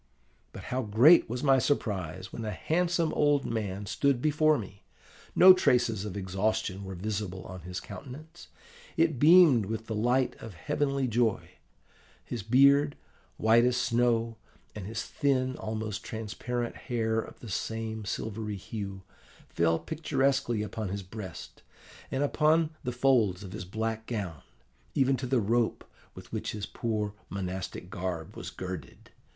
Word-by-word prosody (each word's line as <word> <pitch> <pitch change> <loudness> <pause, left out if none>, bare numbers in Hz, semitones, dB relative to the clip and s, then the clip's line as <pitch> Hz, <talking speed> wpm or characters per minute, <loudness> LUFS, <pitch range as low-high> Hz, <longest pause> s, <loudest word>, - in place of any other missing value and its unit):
But - - -9
how 130 - +1
great 120 +10 +6
was 125 +3 -3
my 135 -2 +5
surprise 95 - -2
when 115 - -5
a 110 - -3
handsome 170 - 0
old 145 -2 +2
man 105 -3 -3
stood 140 +5 +1
before 155 +2 +3
me! 100 -3 -8 0.5
No 185 +1 +10
traces 120 - +2
of 100 -1 -5
exhaustion 100 +1 -1
were 95 -1 -6
visible 100 -1 -4
on 95 0 -8
his 90 +2 -5
countenance: 130 +11 -10 0.5
it 160 -5 +2
beamed 150 - +7
with 110 +1 -4
the 110 - -4
light 120 +4 +1
of 110 -5 -9
a - - -16
heavenly 140 - 0
joy. 115 -2 0 0.7
His 120 - -4
beard, 140 +6 +4 0.4
white 115 +1 +5
as 125 0 +2
snow, 115 -2 +1 0.4
and 100 -3 -7
his 110 +1 -3
thin, 130 -1 0
almost 110 0 -4
transparent 115 +2 -4
hair 115 -3 -1
of - - -7
the 120 - -10
same 110 +2 -3
silvery 105 +1 -4
hue, 100 -1 -6 0.5
fell 80 -1 +2
picturesquely 135 - 0
upon 105 -1 -4
his 100 +1 -4
breast, 95 -2 -9 0.5
and 135 +2 -1
upon 155 +2 +3
the 125 - -2
folds 120 -7 +2
of 95 - -8
his 95 -2 -6
black 110 +3 -3
gown, 95 - -4 0.5
even 135 0 +3
to 130 +1 -4
the 130 0 +2
rope 115 +2 0 0.3
with - - -12
which - - -3
his 105 -1 -4
poor 105 -3 -2 0.2
monastic 95 -1 -5
garb 90 -3 -4
was - - -6
girded. 90 -7 -8
110 Hz, 150 wpm, -29 LUFS, 100-130 Hz, 0.7 s, No